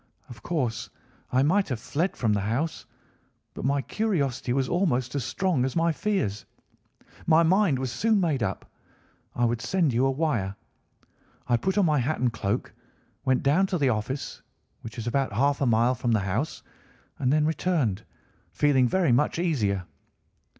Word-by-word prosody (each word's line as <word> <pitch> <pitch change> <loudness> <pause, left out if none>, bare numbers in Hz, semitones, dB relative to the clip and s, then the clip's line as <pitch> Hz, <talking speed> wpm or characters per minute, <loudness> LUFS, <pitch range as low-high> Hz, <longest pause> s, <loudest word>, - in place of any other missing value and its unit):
Of 115 -3 -11
course 120 -9 -2 0.4
I 130 +1 +3
might 190 +6 +2
have 125 -4 -2
fled 160 +10 -2
from 110 -4 +1
the 105 - +1
house, 125 +11 -2 0.7
but - - -7
my 140 0 +1
curiosity 150 - -1
was 130 +1 +1
almost 130 -9 0
as 140 -3 -1
strong 180 - 0
as 130 - -2
my 165 0 +2
fears. 160 - -1 0.8
My 165 0 +5
mind 180 -3 +3
was 130 -1 -3
soon 215 - +2
made 155 -8 0
up. - - -3 0.7
I 120 - +2
would 120 0 0
send 160 +2 +1
you 125 +3 +3
a - - +2
wire. 130 -10 -1 0.9
I 120 - +3
put 190 - -1
on 200 - +4
my 150 -3 +2
hat 140 +6 -1
and 125 -2 +1
cloak, 100 -3 -2 0.5
went 130 -1 +2
down 165 +8 +3
to 185 - -1
the 140 -4 +2
office, 125 +5 -3 0.4
which 115 +1 -9
is 115 - -5
about 130 0 0
half 140 +6 +1
a 135 - +2
mile 120 +2 +3
from 120 -1 -1
the 110 - +3
house, 105 +10 -2 0.6
and 130 -1 +1
then 150 +1 +3
returned, 150 - 0 0.5
feeling 135 -4 +3
very 175 +2 +2
much 145 +7 +2
easier. 110 - 0
135 Hz, 170 wpm, -26 LUFS, 120-165 Hz, 0.9 s, My